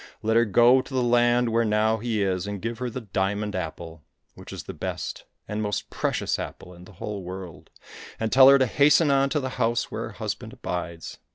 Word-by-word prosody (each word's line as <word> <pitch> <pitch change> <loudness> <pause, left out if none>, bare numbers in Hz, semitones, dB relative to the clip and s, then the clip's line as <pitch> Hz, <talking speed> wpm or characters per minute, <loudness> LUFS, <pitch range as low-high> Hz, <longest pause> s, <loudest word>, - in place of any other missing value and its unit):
Let 110 +1 +1
her 115 +1 +5
go 120 +5 +5
to 130 - -12
the 130 - +2
land 120 0 +3
where 115 +1 +2
now 110 0 +2
he 110 -2 -1
is, 95 0 -1
and 100 -1 -4
give 115 +3 -4
her 125 -1 -2
the 125 +2 -6
diamond 100 0 -2
apple, 80 -2 -6 0.3
which - - -12
is - - -7
the - - -8
best - - -5 0.2
and 105 +1 -3
most 105 -2 -3
precious - - -1
apple 90 - -8
in 90 0 -14
the 100 - -15
whole 100 +2 -6
world, 90 -2 -9 0.5
and 110 -1 -2
tell 135 0 +8
her 140 - +8
to 130 - +3
hasten 145 +4 +4
on 135 0 +3
to 150 - 0
the 130 -2 -3
house 115 +1 0
where - - -4
her - - -8
husband - - -5
abides. 85 -2 -6
110 Hz, 215 wpm, -25 LUFS, 95-120 Hz, 0.5 s, tell